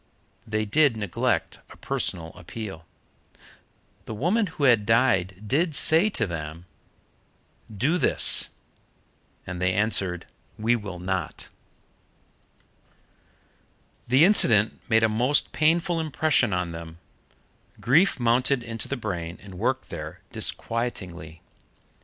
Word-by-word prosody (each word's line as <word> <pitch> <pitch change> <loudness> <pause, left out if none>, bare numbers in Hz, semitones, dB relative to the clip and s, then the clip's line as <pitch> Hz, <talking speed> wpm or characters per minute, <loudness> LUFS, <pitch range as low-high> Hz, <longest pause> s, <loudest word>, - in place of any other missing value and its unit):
They 110 0 -1
did 140 +2 +2
neglect 100 -6 -2
a - - -14
personal 80 -1 -3
appeal. 90 -3 -9 1.2
The 110 - -6
woman 195 - +1
who 160 -3 -6
had 120 -6 +4
died 105 -5 +1
did 155 - 0
say 165 +8 +5
to 115 - +1
them, 80 -1 -7 1.1
"Do 135 - 0
this," 135 - +4 1.0
and 90 -1 -6
they 90 0 +2
answered, 95 -4 0 0.3
"We 115 +3 +1
will 100 -5 -6
not." 95 +1 -4 2.6
The 130 +6 +5
incident 115 - +4
made 110 -1 +3
a - - +5
most 120 +7 +1
painful 165 +2 +1
impression 155 -6 +1
on 90 -2 -2
them. 80 0 -9 0.8
Grief 160 +7 +3
mounted 125 +2 +1
into 115 -1 -5
the 140 - -3
brain 90 -6 -5
and 95 -3 -11
worked - - -1
there - - -8
disquietingly. 90 -9 -3
110 Hz, 110 wpm, -25 LUFS, 90-140 Hz, 2.6 s, say